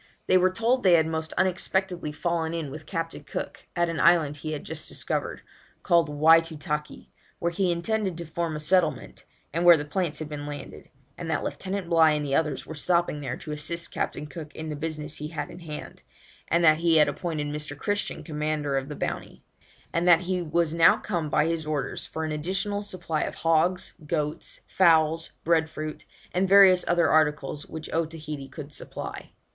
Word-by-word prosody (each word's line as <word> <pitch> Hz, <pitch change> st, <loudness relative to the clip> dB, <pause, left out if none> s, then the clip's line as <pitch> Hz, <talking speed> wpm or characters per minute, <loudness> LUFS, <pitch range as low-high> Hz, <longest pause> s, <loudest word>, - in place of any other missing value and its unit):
They -, -, +3 dB
were 185 Hz, 0 st, +5 dB
told 230 Hz, +7 st, +1 dB
they 185 Hz, -5 st, +5 dB
had 160 Hz, -2 st, +5 dB
most 160 Hz, 0 st, -3 dB
unexpectedly 185 Hz, -2 st, 0 dB
fallen 165 Hz, +1 st, -1 dB
in 155 Hz, -5 st, -4 dB
with 155 Hz, +2 st, -9 dB
Captain 165 Hz, -2 st, -4 dB
Cook -, -, -6 dB
at 175 Hz, -1 st, +2 dB
an 165 Hz, -2 st, -3 dB
island 160 Hz, -3 st, +4 dB
he 155 Hz, +2 st, -5 dB
had 150 Hz, -, -5 dB
just -, -, -5 dB
discovered, -, -, -3 dB, 0.4 s
called 170 Hz, -2 st, +3 dB
Whytootakee, 150 Hz, 0 st, +2 dB, 0.3 s
where 170 Hz, -, -1 dB
he 180 Hz, +1 st, +1 dB
intended 190 Hz, +1 st, -1 dB
to 170 Hz, -, -6 dB
form 165 Hz, 0 st, -3 dB
a -, -, -4 dB
settlement, 160 Hz, 0 st, 0 dB, 0.3 s
and 170 Hz, +2 st, 0 dB
where 175 Hz, -1 st, +9 dB
the 145 Hz, -, -4 dB
plants 155 Hz, 0 st, -2 dB
had 155 Hz, -, -4 dB
been 145 Hz, -1 st, -6 dB
landed; 145 Hz, 0 st, -8 dB, 0.3 s
and -, -, -5 dB
that -, -, 0 dB
Lieutenant 190 Hz, -1 st, -4 dB
Bligh 160 Hz, -2 st, +5 dB
and 150 Hz, -1 st, -2 dB
the 135 Hz, -, -2 dB
others 150 Hz, -2 st, 0 dB
were -, -, -7 dB
stopping 170 Hz, -1 st, +1 dB
there 130 Hz, -3 st, -4 dB
to 155 Hz, -, -8 dB
assist 170 Hz, +3 st, -3 dB
Captain -, -, -3 dB
Cook 150 Hz, +1 st, -9 dB
in 160 Hz, 0 st, -5 dB
the 150 Hz, -, -3 dB
business 155 Hz, 0 st, -4 dB
he 150 Hz, -, -5 dB
had 155 Hz, -2 st, -5 dB
in -, -, -10 dB
hand, 155 Hz, -3 st, -8 dB, 0.5 s
and 170 Hz, +1 st, +2 dB
that 155 Hz, -1 st, +6 dB
he 165 Hz, -1 st, +4 dB
had 150 Hz, -, +6 dB
appointed 160 Hz, -4 st, -3 dB
Mr. 145 Hz, 0 st, -5 dB
Christian 205 Hz, +6 st, -2 dB
commander 150 Hz, -3 st, -1 dB
of 135 Hz, +1 st, -3 dB
the 150 Hz, -, -5 dB
Bounty; -, -, -5 dB, 0.5 s
and 170 Hz, +1 st, +1 dB
that 170 Hz, -1 st, +7 dB
he 180 Hz, 0 st, -1 dB
was 165 Hz, -1 st, 0 dB
now 165 Hz, 0 st, +6 dB
come 170 Hz, -7 st, -3 dB
by 150 Hz, +1 st, +3 dB
his 165 Hz, -1 st, -2 dB
orders 145 Hz, -4 st, -2 dB
for 160 Hz, -, -4 dB
an 155 Hz, -, -3 dB
additional 195 Hz, +6 st, -1 dB
supply 175 Hz, -6 st, -3 dB
of -, -, -3 dB
hogs, 165 Hz, +3 st, +1 dB
goats, 150 Hz, -1 st, -3 dB
fowls, 165 Hz, -2 st, +3 dB
bread 160 Hz, -1 st, +2 dB
fruit, 155 Hz, -1 st, -6 dB, 0.3 s
and 185 Hz, +1 st, +1 dB
various 190 Hz, -2 st, +7 dB
other 170 Hz, -1 st, +3 dB
articles 150 Hz, -2 st, +1 dB
which 160 Hz, -1 st, -7 dB
Otaheite 155 Hz, -4 st, -3 dB
could 150 Hz, -1 st, -8 dB
supply. -, -, -7 dB
160 Hz, 190 wpm, -26 LUFS, 150-175 Hz, 0.5 s, where